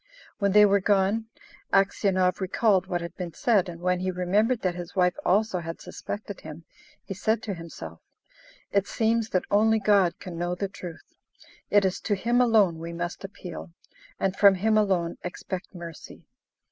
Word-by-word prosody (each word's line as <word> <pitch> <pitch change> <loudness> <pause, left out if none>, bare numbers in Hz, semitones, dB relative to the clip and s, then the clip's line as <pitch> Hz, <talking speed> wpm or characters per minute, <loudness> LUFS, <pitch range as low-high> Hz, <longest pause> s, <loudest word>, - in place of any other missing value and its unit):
When 200 -2 +2
they 210 0 +8
were 200 0 +4
gone, 205 +3 +1 0.4
Aksionov 195 -2 +2
recalled 190 0 +2
what 175 -2 -2
had 170 0 -7
been 175 -4 -6
said, 205 -5 +2
and 170 -1 -8
when 180 0 +1
he 185 +1 -1
remembered 205 +7 +1
that 185 -2 +1
his 175 +1 -8
wife 180 -1 +3
also 200 0 +2
had 165 0 -6
suspected 205 -1 -7
him, 160 +1 -10 0.4
he - - -5
said 220 +4 0
to 205 - -3
himself, 165 -2 -9 0.7
"It 200 0 +1
seems 225 0 0
that 185 - 0
only 220 +2 +4
God 200 -5 +3
can 175 -4 -8
know 175 +1 -1
the 195 +1 -3
truth; 175 -3 -10 0.6
it 205 -1 +4
is 190 0 0
to 205 - -1
Him 240 +5 +2
alone 210 -9 +3
we 165 +1 -6
must 175 +2 -5
appeal, 180 -3 -8 0.5
and 190 0 0
from 200 -1 +6
Him 215 +4 +1
alone 190 -5 +1
expect 185 +2 -6
mercy." 170 -2 -10
190 Hz, 170 wpm, -26 LUFS, 175-210 Hz, 0.7 s, they